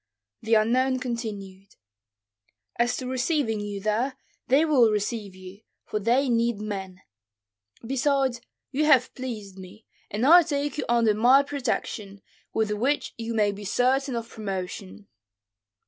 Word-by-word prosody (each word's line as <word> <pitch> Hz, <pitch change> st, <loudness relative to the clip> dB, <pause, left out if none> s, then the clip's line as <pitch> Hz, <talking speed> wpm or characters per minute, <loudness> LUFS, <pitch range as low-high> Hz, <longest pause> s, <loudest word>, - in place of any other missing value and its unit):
The 225 Hz, +1 st, +2 dB
unknown 255 Hz, +4 st, +2 dB
continued, 210 Hz, -6 st, -6 dB, 1.0 s
"As 240 Hz, +1 st, +1 dB
to 255 Hz, -, -5 dB
receiving 255 Hz, -2 st, 0 dB
you 205 Hz, -1 st, -5 dB
there, 225 Hz, +6 st, -1 dB, 0.3 s
they 280 Hz, +5 st, +4 dB
will 265 Hz, -8 st, +4 dB
receive 210 Hz, -1 st, -2 dB
you, 185 Hz, +2 st, -12 dB, 0.2 s
for 210 Hz, -, -3 dB
they 245 Hz, +6 st, +2 dB
need 235 Hz, -2 st, +1 dB
men; 195 Hz, -3 st, -6 dB, 0.8 s
besides, 270 Hz, -1 st, 0 dB, 0.3 s
you 295 Hz, +3 st, +1 dB
have 265 Hz, -5 st, +4 dB
pleased 215 Hz, -7 st, -7 dB
me, 190 Hz, +4 st, -13 dB, 0.2 s
and 215 Hz, +5 st, -1 dB
I 340 Hz, +5 st, +9 dB
take 290 Hz, -3 st, -2 dB
you 275 Hz, -, -2 dB
under 230 Hz, -2 st, +3 dB
my 250 Hz, +6 st, +5 dB
protection, 220 Hz, -8 st, -4 dB, 0.3 s
with 220 Hz, -1 st, 0 dB
which 255 Hz, +8 st, -1 dB
you 230 Hz, 0 st, -4 dB
may 210 Hz, -2 st, +2 dB
be 200 Hz, +1 st, -9 dB
certain 255 Hz, +5 st, +1 dB
of 230 Hz, -1 st, -4 dB
promotion." 180 Hz, -, -6 dB
230 Hz, 135 wpm, -26 LUFS, 205-260 Hz, 1.0 s, I